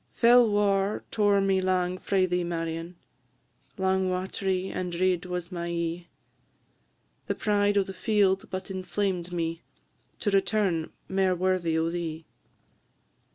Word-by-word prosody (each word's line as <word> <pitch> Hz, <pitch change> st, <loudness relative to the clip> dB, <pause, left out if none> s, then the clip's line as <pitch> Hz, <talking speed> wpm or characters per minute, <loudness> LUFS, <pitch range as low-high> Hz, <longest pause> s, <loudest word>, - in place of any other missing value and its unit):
Fell 240 Hz, -1 st, +6 dB
war 205 Hz, -1 st, +1 dB
tore 205 Hz, -2 st, +3 dB
me 195 Hz, -1 st, +2 dB
lang 185 Hz, -1 st, 0 dB
frae 190 Hz, -2 st, +1 dB
thee, 180 Hz, -1 st, 0 dB
Marion, 165 Hz, 0 st, -4 dB, 0.8 s
Lang 190 Hz, 0 st, +1 dB
wat'ry 185 Hz, 0 st, -2 dB
and 175 Hz, -2 st, -4 dB
red 185 Hz, -1 st, +1 dB
was 180 Hz, -1 st, -4 dB
my 170 Hz, -1 st, -4 dB
e'e; 170 Hz, 0 st, -3 dB, 1.2 s
The -, -, -1 dB
pride 205 Hz, -1 st, +1 dB
o' 200 Hz, -, +4 dB
the 195 Hz, -, -8 dB
field 195 Hz, -1 st, +1 dB
but 185 Hz, +1 st, -5 dB
inflamed 185 Hz, -1 st, -2 dB
me 165 Hz, -1 st, -2 dB, 0.6 s
To 205 Hz, -, +1 dB
return 195 Hz, -4 st, +1 dB, 0.2 s
mair 190 Hz, -1 st, +1 dB
worthy 180 Hz, -2 st, +1 dB
o' 165 Hz, +1 st, 0 dB
thee. 165 Hz, -2 st, -4 dB
185 Hz, 130 wpm, -27 LUFS, 175-195 Hz, 1.2 s, Fell